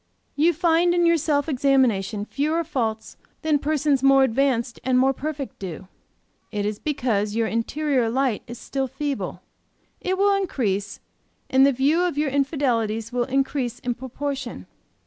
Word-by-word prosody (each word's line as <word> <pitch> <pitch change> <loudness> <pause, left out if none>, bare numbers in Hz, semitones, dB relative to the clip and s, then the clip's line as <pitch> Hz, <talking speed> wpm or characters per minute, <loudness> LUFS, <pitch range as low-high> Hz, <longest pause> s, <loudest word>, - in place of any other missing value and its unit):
"You 315 +4 +4
find 340 +1 +3
in 345 -1 +3
your 335 0 +4
self 290 -2 0
examination 245 -8 +1
fewer 305 +7 -1
faults 230 -8 -3 0.3
than 310 -2 +2
persons 295 -2 +1
more 270 0 +6
advanced 255 -1 +1
and 255 0 +2
more 265 +1 +4
perfect 290 0 -5
do; 185 -1 -7 0.6
it 205 -2 -2
is 210 0 -2
because 220 -8 -1
your 230 0 +1
interior 250 +2 0
light 255 -2 0
is 240 0 -8
still 270 +2 -3
feeble. 275 +1 -4 0.6
It 375 +1 -1
will 400 +1 +4
increase, 210 - -1 0.5
and 265 +1 +6
the - - +4
view 280 +6 +2
of 355 -5 0
your 295 -2 +1
infidelities 245 -6 0
will 245 -1 +1
increase 265 -2 -1
in 245 - -2
proportion. 270 +3 -5
270 Hz, 150 wpm, -23 LUFS, 230-295 Hz, 0.6 s, more